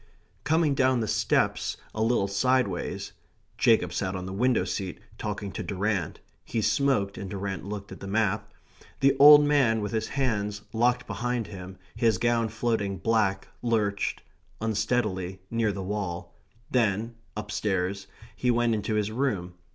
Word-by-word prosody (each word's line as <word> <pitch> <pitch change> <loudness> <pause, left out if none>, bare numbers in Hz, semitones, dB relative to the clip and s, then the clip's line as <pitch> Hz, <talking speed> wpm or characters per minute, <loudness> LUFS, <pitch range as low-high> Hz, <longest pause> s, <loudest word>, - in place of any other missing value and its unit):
Coming 155 -1 +2
down 130 -2 +3
the 110 - -1
steps - - +1 0.2
a 110 - -3
little 110 -3 +2
sideways 100 -1 0 0.5
[Jacob - - +4
sat 95 -1 -2
on 90 -1 -4
the 95 - -5
window 125 +4 +2
seat 95 -4 -4 0.2
talking 105 -1 -4
to - - -5
Durrant; 100 -4 -2 0.2
he 115 - -2
smoked, 110 -2 +1
and 95 -1 -5
Durrant 95 0 -4
looked 100 0 -6
at - - -9
the 95 - -7
map], 105 0 0 0.5
the 135 0 +4
old 145 +1 +10
man, 135 -7 +3
with 105 -1 -3
his 110 -1 -1
hands 105 -6 -1
locked 120 +2 +2
behind 120 0 -2
him, 95 -1 -9 0.2
his 115 -3 +2
gown 115 +1 +1
floating 110 -3 -1
black, 95 -2 +1
lurched, 105 -4 0 0.4
unsteadily, 105 -4 -1
near 115 -2 +1
the 95 -1 -5
wall; 95 -3 -4 0.4
then, 115 -1 +1 0.2
upstairs 95 -1 -2 0.3
he 125 - 0
went 120 -1 +3
into 110 0 -1
his 105 0 0
room. 110 -8 -1
110 Hz, 150 wpm, -27 LUFS, 100-120 Hz, 0.5 s, old